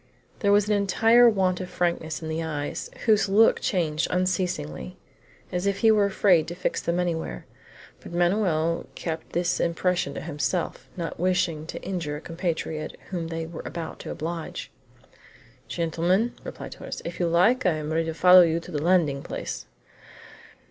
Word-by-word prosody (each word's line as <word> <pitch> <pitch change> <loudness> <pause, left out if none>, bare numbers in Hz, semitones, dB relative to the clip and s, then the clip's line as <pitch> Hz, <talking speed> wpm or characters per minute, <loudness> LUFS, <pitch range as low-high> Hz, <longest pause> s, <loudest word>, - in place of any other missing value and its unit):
There 200 - +2
was 205 0 +4
an 210 - +2
entire 225 +4 +5
want 185 -4 +1
of 185 - -6
frankness 165 -4 -2
in - - -4
the 160 +1 -2
eyes, 150 -3 -4 0.2
whose 215 -3 +4
look 215 +3 +5
changed 160 -5 0
unceasingly, 180 - -2 0.5
as 180 +2 -1
if 200 0 -1
he 225 - +6
was 210 -2 +4
afraid 180 -5 +4
to 175 - -5
fix 180 - -2
them 170 +1 -1
anywhere. 165 - -2 0.5
But - - -11
Manoel 175 -2 +1
kept 160 -1 -5
this 175 0 0
impression 175 +1 0
to - - -4
himself, 160 +4 -3
not 170 -2 -4
wishing 180 -3 0
to - - -6
injure 175 -6 -3
a 150 - -7
compatriot 165 -2 -3
whom 170 -3 -3
they 165 0 -4
were 165 0 -7
about 165 -2 -6
to - - -8
oblige. 165 +1 -5 1.0
"Gentlemen," 175 +7 0
said - - -8
Torres, - - -7
"if 170 - -6
you 175 - +2
like, 185 +8 +3
I 180 - +4
am 155 0 -3
ready 165 0 +1
to 160 - -3
follow 180 +2 +8
you 165 -1 +3
to 175 - -11
the 150 -3 -2
landing 160 -5 +2
place." - - -6
175 Hz, 170 wpm, -26 LUFS, 160-185 Hz, 1.0 s, follow